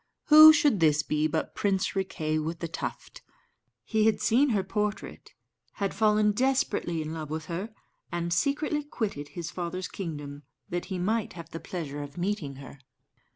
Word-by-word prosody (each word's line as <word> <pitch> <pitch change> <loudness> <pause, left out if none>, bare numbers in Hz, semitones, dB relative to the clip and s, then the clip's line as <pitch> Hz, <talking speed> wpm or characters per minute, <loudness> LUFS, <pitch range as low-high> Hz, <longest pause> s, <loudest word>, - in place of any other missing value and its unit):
Who 310 +1 +11
should 290 - +3
this 155 -2 +3
be 155 0 0
but 155 - -2
Prince 195 -2 0
Riquet 160 -5 -1
with 165 +2 -3
the 170 - -4
Tuft? 165 - -6 0.6
He 220 -1 +2
had 220 - +2
seen 270 +6 +3
her 205 -5 +1
portrait, 210 +2 -4 0.4
had 200 -2 -2
fallen 210 -1 +3
desperately 255 - 0
in 155 +1 -5
love 155 -2 -6
with 155 0 -4
her, 175 +7 -4 0.4
and 170 0 -1
secretly 295 - 0
quitted 210 - -4
his 170 +1 -6
father's 180 +1 -4
kingdom 145 -6 -6 0.3
that 175 0 -3
he 190 - -4
might 215 +5 -1
have 170 -2 -10
the 165 - -6
pleasure 150 -6 -5
of 145 +1 -9
meeting 175 -6 -2
her. 135 +1 -11
180 Hz, 165 wpm, -28 LUFS, 155-215 Hz, 0.6 s, Who